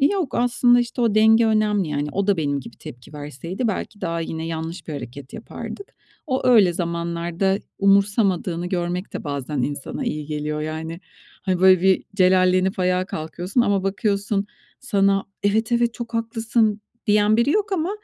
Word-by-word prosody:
Yok. 325 Hz, 0 st, +1 dB
Aslında, 245 Hz, 0 st, +4 dB
işte, 240 Hz, +1 st, -3 dB
o 230 Hz, -3 st, +2 dB
denge 220 Hz, +1 st, +5 dB
önemli, 210 Hz, -4 st, +1 dB
yani. 145 Hz, 0 st, -2 dB
O 200 Hz, 0 st, -1 dB
da 200 Hz, -2 st, +3 dB
benim 145 Hz, -3 st, -1 dB
gibi -, -, -12 dB
tepki 125 Hz, +5 st, -11 dB
verseydi 150 Hz, -, -4 dB
belki 205 Hz, +1 st, -4 dB
daha 170 Hz, -2 st, -2 dB
yine 160 Hz, 0 st, -4 dB
yanlış 165 Hz, +1 st, -5 dB
bir 155 Hz, -, -4 dB
hareket 135 Hz, -1 st, -8 dB
yapardık. 395 Hz, -, -8 dB, 0.3 s
O 260 Hz, -3 st, -1 dB
öyle 205 Hz, -8 st, +6 dB
zamanlarda 170 Hz, +2 st, -1 dB, 0.2 s
umursamadığını 195 Hz, -3 st, +2 dB
görmek 180 Hz, +1 st, -3 dB
de -, -, -6 dB
bazen 140 Hz, -1 st, -3 dB
insana 145 Hz, 0 st, -4 dB
iyi 150 Hz, -1 st, -3 dB
geliyor. 150 Hz, 0 st, -3 dB
Yani, 160 Hz, +2 st, -5 dB, 0.4 s
hani, 185 Hz, -2 st, -1 dB
böyle 185 Hz, -1 st, +6 dB
bir 190 Hz, -1 st, +3 dB
celallenip 185 Hz, 0 st, +3 dB
ayağa 185 Hz, 0 st, +1 dB
kalkıyorsun 175 Hz, +8 st, -2 dB
ama 200 Hz, -4 st, +2 dB
bakıyorsun 200 Hz, +1 st, -1 dB, 0.3 s
sana 195 Hz, -6 st, +2 dB, 0.2 s
“Evet, 220 Hz, +3 st, +1 dB
evet, 235 Hz, -1 st, +2 dB
çok 235 Hz, -1 st, -7 dB
haklısın.“ 225 Hz, -1 st, 0 dB, 0.3 s
diyen 210 Hz, +1 st, +4 dB
biri 235 Hz, +4 st, +2 dB
yok 410 Hz, +3 st, 0 dB
ama 350 Hz, 0 st, 0 dB
190 Hz, 160 wpm, -22 LUFS, 165-220 Hz, 0.4 s, öyle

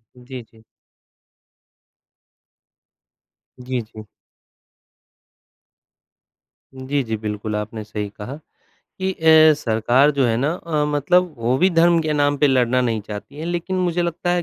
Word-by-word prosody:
उ, 125 Hz, -, -17 dB
जी, 130 Hz, -1 st, -8 dB
जी। 110 Hz, -1 st, -22 dB, 3.0 s
जी, 125 Hz, 0 st, -3 dB
जी। 110 Hz, -1 st, -12 dB, 2.7 s
जी, 135 Hz, +2 st, -2 dB
जी, 110 Hz, -2 st, -3 dB
बिल्कुल, 105 Hz, 0 st, -4 dB
आपने 105 Hz, +1 st, -5 dB
सही 105 Hz, -1 st, -5 dB
कहा 105 Hz, +6 st, -8 dB, 0.7 s
कि 190 Hz, 0 st, -1 dB
अ, 160 Hz, -2 st, +6 dB
सरकार 120 Hz, +3 st, +2 dB
जो 135 Hz, -, +3 dB
है 115 Hz, -1 st, +1 dB
ना 140 Hz, +6 st, 0 dB
अ, 160 Hz, -4 st, -2 dB
मतलब 155 Hz, +4 st, +1 dB
वो 120 Hz, +2 st, 0 dB
भी 185 Hz, -, +4 dB
धर्म 170 Hz, 0 st, +4 dB
के 155 Hz, -1 st, -1 dB
नाम 145 Hz, -1 st, +1 dB
पे 145 Hz, -, +4 dB
लड़ना 130 Hz, -2 st, +2 dB
नहीं 115 Hz, -3 st, -1 dB
चाहती 105 Hz, +6 st, -9 dB
है, 155 Hz, -, -5 dB
लेकिन 175 Hz, +2 st, -3 dB
मुझे 175 Hz, -1 st, 0 dB
लगता 175 Hz, +1 st, -2 dB
है 175 Hz, 0 st, +1 dB
135 Hz, 135 wpm, -20 LUFS, 115-160 Hz, 3.0 s, अ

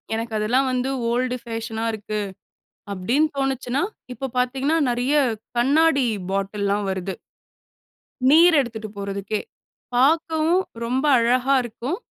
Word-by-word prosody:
எனக்கு 225 Hz, 0 st, -4 dB
அதெல்லாம் 250 Hz, +6 st, +2 dB
வந்து 255 Hz, +1 st, -1 dB, 0.2 s
ஓல்டு 250 Hz, +1 st, 0 dB
ஃபேஷனா 225 Hz, -1 st, -4 dB
இருக்கு. 215 Hz, 0 st, -4 dB, 0.7 s
அப்படின்னு 235 Hz, +11 st, +1 dB
தோணுச்சுனா, 270 Hz, -1 st, -1 dB, 0.3 s
இப்போ 270 Hz, +3 st, -4 dB
பாத்தீங்கன்னா 265 Hz, +5 st, +1 dB
நெறைய 245 Hz, +4 st, +1 dB, 0.4 s
கண்ணாடி 280 Hz, +1 st, +3 dB, 0.2 s
பாட்டில்லாம் 200 Hz, +1 st, -1 dB
வருது. 190 Hz, 0 st, -4 dB, 1.2 s
நீர் 335 Hz, +3 st, +7 dB
எடுத்துட்டு 225 Hz, -4 st, -4 dB
போறதுக்கே 200 Hz, +1 st, -3 dB, 0.5 s
பார்க்கவும் 320 Hz, +6 st, +3 dB, 0.2 s
ரொம்ப 255 Hz, +4 st, -1 dB
அழகா 250 Hz, +3 st, +2 dB
இருக்கும். 240 Hz, +7 st, -4 dB
245 Hz, 105 wpm, -23 LUFS, 220-270 Hz, 1.2 s, நீர்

